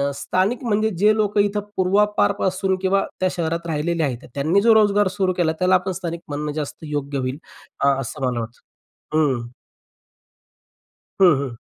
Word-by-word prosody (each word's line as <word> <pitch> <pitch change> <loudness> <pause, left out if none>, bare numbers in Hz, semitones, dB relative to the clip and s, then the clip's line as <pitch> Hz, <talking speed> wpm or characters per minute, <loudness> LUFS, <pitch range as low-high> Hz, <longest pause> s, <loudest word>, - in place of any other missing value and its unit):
स्थानिक 185 - -1
म्हणजे 220 -1 +1
जे 210 +3 +4
लोकं 210 -1 +1
इथं 205 0 +1 0.2
पूर्वापारपासून 190 - +1
किंवा 195 +1 +2 0.2
त्या 185 - +2
शहरात 170 -1 -2
राहिलेले 165 +2 -1
आहेत. 125 -4 -3
त्यांनी 155 +8 +2
जो 230 -1 +6
रोजगार 205 -2 +4
सुरू 185 -1 +2
केला, 160 -2 +2
त्याला 185 +1 +3
आपण 185 +1 +1
स्थानिक 170 -2 -5
म्हणणं 150 +1 -3
जास्त 150 -1 -4
योग्य 145 -1 -3
होईल, 130 +2 -3 0.4
अ, 140 - +3
असं 135 +2 -5
मला 125 -2 -1
वाटतं. 115 +1 -8 0.5
हं. 130 -7 +1 1.7
हं, 175 -6 +7
हं. 130 -4 -5
170 Hz, 155 wpm, -21 LUFS, 145-195 Hz, 1.7 s, हं